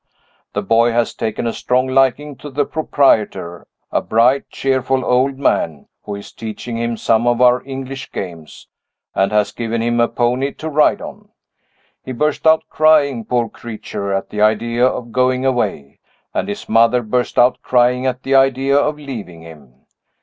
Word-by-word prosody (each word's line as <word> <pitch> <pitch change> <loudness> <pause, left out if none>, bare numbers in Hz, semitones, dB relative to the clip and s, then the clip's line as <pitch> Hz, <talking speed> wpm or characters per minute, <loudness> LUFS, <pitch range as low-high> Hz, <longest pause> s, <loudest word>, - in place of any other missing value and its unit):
The - - -2
boy 115 +1 +3
has 120 0 0
taken 110 +1 -3
a 115 - -1
strong 125 +1 0
liking 135 +2 +1
to 145 - -9
the 145 +1 -1
proprietor 105 - 0 0.2
a - - +1
bright, 125 +5 +2
cheerful 130 -1 -1
old 130 +2 +1
man, 80 - -1 0.2
who 105 - -5
is 100 - -10
teaching 115 +1 -7
him 115 0 -2
some 115 +2 +1
of 120 0 +2
our 125 0 +4
English 135 0 -7
games, 85 -5 -8 0.5
and 95 +1 +1
has 105 -1 +1
given 115 0 -3
him 120 0 0
a 120 - +4
pony 125 +4 -1
to 160 - -6
ride 150 0 +2
on. - - -10 0.7
He 130 - -6
burst 150 +5 0
out 160 0 +5
crying, 145 -7 +3
poor 120 -2 0
creature, 105 -3 -6
at 95 0 -2
the 105 - -3
idea 115 +3 +2
of 120 -2 -4
going 130 +1 +1
away 105 - -2 0.3
and - - -2
his 100 - -6
mother 115 +2 +3
burst 120 +3 -2
out 125 +1 +4
crying 125 +1 +2
at 130 0 -3
the 135 - -1
idea 135 0 +3
of 150 +1 +1
leaving 110 - -8
him. 70 -6 -16
125 Hz, 170 wpm, -18 LUFS, 110-135 Hz, 0.7 s, out